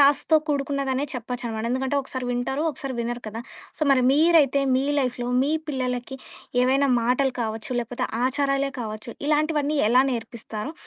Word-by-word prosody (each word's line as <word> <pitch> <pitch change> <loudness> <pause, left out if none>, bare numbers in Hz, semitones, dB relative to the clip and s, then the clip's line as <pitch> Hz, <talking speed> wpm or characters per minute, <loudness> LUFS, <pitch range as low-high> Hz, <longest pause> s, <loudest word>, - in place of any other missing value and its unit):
టాస్క్‌తో 285 +3 +5
కూడుకున్నదనే 275 -1 0
చెప్పొచ్చు 245 +1 -5
అనమాట. 220 0 -4
ఎందుకంటే 265 +2 0
ఒకసారి 260 -1 -5
వింటారు, 245 +4 -1
ఒకసారి 275 -2 -6
వినరు 240 +1 -3
కదా! 220 +2 -5 0.4
సో - - -5
మరి 260 -2 +4
మీరైతే 300 -2 +4
మీ 265 +1 +2
లైఫ్‌లో 250 -2 -1 0.2
మీ 285 - +1 0.2
పిల్లలకి 255 -1 -3 0.5
ఏవైనా 270 +2 +3
మాటలు 255 +3 +1
కావచ్చు, 220 +1 -3
లేకపోతే 240 +1 -3 0.2
ఆచారాలే 275 +1 0
కావచ్చు 215 +1 -6
ఇలాంటివన్నీ 300 0 +1
ఎలా 250 +3 +5
నేర్పిస్తారు? 230 +1 -5
260 Hz, 145 wpm, -24 LUFS, 245-280 Hz, 0.5 s, టాస్క్‌తో